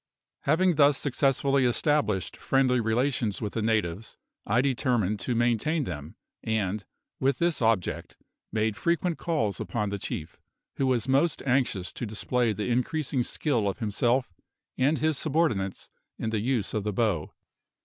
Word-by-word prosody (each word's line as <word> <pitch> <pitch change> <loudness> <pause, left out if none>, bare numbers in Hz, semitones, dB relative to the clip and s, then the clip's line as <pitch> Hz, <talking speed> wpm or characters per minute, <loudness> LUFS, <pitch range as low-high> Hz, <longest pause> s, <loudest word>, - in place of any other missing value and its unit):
Having 165 +3 +3
thus 145 -1 +5
successfully 135 0 +1
established 120 - +1
friendly 130 -2 +2
relations 115 -1 0
with 105 -2 -4
the 115 - -1
natives 110 -2 -1 0.3
I 110 +4 +3
determined 120 -6 +1
to 120 +5 -2
maintain 120 +7 +1
them, 75 - -6 0.3
and, 105 -2 -1 0.4
with 135 -1 +2
this 170 -4 0
object, 110 -6 0 0.3
made 110 -1 0
frequent 170 - 0
calls 150 - -1
upon 105 -3 -2
the 100 0 -3
chief, 80 -3 -6 0.4
who 135 - +1
was 125 -2 +1
most 140 +5 +2
anxious 125 -8 0
to 120 - -4
display 115 +2 0
the 105 0 -3
increasing 130 +2 0
skill 120 -4 0
of 95 - -4
himself 120 +1 0 0.4
and 140 +5 +2
his 155 -2 +1
subordinates 135 - 0 0.3
in 110 - -2
the 110 - 0
use 120 -2 -1
of 105 - -1
the 105 0 -2
bow. 95 -8 0
120 Hz, 150 wpm, -27 LUFS, 105-140 Hz, 0.4 s, thus